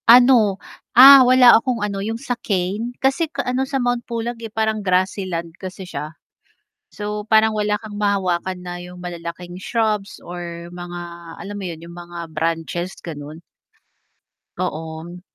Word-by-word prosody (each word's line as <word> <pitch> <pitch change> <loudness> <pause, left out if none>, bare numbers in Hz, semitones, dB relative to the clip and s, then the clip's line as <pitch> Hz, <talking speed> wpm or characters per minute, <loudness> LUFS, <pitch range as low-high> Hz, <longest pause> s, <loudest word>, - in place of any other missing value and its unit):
Ano, 240 -5 +7 0.4
ah, 270 +2 +11
wala 250 -1 +7
akong 240 -1 -1
ano 200 -1 -3
yung 225 +3 -3
sa 250 +1 -3
cane, 205 +5 -2
kasi 275 +4 +1 0.2
ano, 255 +1 0
sa 275 - 0
Mount 245 -1 0
Pulag, 235 0 -3
eh, 225 - -6
parang 220 0 -1
grassyland 185 -3 -1
kasi 190 0 -7
siya, 155 -2 -7 0.7
so, 210 0 -5
parang 220 0 +5
wala 210 -1 0
kang 215 -1 -10
mahawakan 190 -3 0
na 175 0 -6
yung 180 0 -10
malalaking 175 0 -7
shrubs 215 -2 -1
or 170 -1 -7
mga 175 0 -7 0.4
alam 205 +1 -7
mo 200 - -6
yun 165 0 -8
yung 170 - -11
mga 175 0 -10 0.2
branches 165 +3 -2
ganon. 155 -1 -8 1.2
Oo. 160 +2 -5
195 Hz, 145 wpm, -21 LUFS, 175-225 Hz, 1.2 s, ah